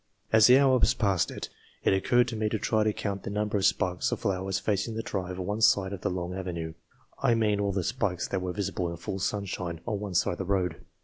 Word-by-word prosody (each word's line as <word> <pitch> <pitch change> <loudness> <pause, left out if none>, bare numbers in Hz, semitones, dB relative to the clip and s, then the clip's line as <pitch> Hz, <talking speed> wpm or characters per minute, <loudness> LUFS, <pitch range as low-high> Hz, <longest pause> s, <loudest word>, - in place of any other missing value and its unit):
As 110 -1 +8
the 125 +1 +8
hours 130 -2 +4
passed 100 -8 +1
by, - - -8 0.5
it - - +3
occurred 120 +6 +3
to 115 - -4
me 110 -1 0
to 110 - -1
try 110 +1 +1
to 110 - +2
count 100 -2 -4
the - - -6
number 105 +1 -1
of 100 -1 +2
spikes 90 -1 0
of - - -2
flowers 95 0 -1
facing 105 +2 -1
the 115 - -3
drive 90 -2 -4
on 90 - -3
one 105 +3 -2
side 100 -3 +4
of 95 - -6
the - - 0
long 90 0 -3
avenue 85 -4 -4 0.5
I 120 - +3
mean 105 -2 +1
all 100 -1 +1
the 95 -1 -1
spikes 100 -5 -1
that 95 - -1
were 90 0 -2
visible 90 -2 -2
in 85 - -6
full 95 +3 -5
sunshine 90 -4 -3
on 105 -4 -2
one 100 -3 -5
side - - +3
of 85 - -4
the 95 - -2
road. 90 -3 0
100 Hz, 250 wpm, -28 LUFS, 90-110 Hz, 0.5 s, As